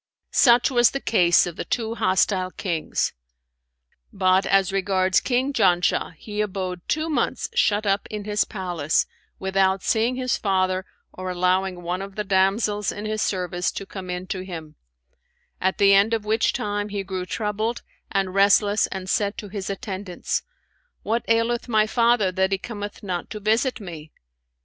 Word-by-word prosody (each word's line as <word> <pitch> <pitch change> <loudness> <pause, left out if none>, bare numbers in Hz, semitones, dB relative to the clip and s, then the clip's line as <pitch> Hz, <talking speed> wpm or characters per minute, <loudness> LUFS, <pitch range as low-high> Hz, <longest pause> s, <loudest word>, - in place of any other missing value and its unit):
Such 240 0 +5
was 240 -2 +5
the 275 - -3
case 180 -9 +4
of 175 -2 -6
the - - -3
two 225 -2 -2
hostile 190 -3 +1
Kings; 170 -4 -2 1.0
but 190 0 +2
as 195 -1 +3
regards 190 -1 +2
King 260 +2 0
Janshah, 180 -5 +2
he 210 +5 -4
abode 185 -3 -3
two 315 +1 0
months 455 +8 -1
shut 210 - +2
up 200 0 +1
in 210 -1 -5
his 210 0 +1
palace, 175 -7 -1 0.3
without 190 0 +1
seeing 230 +3 +1
his 255 -1 0
father 185 -2 0 0.3
or 185 0 -5
allowing 180 0 0
one 180 +2 -2
of 195 0 -8
the 210 - -2
damsels 200 +2 +1
in 205 - -6
his 215 0 -2
service 180 -2 -1
to 195 - -5
come 190 -2 -8
in 180 0 -4
to 185 0 -4
him; 165 -5 -8 0.9
at 190 +1 +1
the 200 0 +5
end 205 +4 +4
of 215 -2 -5
which 220 +2 +2
time 205 0 -2
he 200 -1 -3
grew 185 -1 -5
troubled 215 +4 -2 0.3
and 195 -2 0
restless 200 +1 +4
and 190 -1 -6
said 200 +1 0
to 205 - -7
his 195 -1 -5
attendants, 195 -3 -3 0.6
'What 230 +2 0
aileth 230 +2 +1
my 215 -2 +4
father 230 -3 +2
that 190 +1 +1
he 195 - +2
cometh 205 0 -7
not 180 -3 -4
to 215 - -6
visit 225 +5 +1
me?' 165 -6 -9
195 Hz, 165 wpm, -23 LUFS, 185-215 Hz, 1.0 s, Such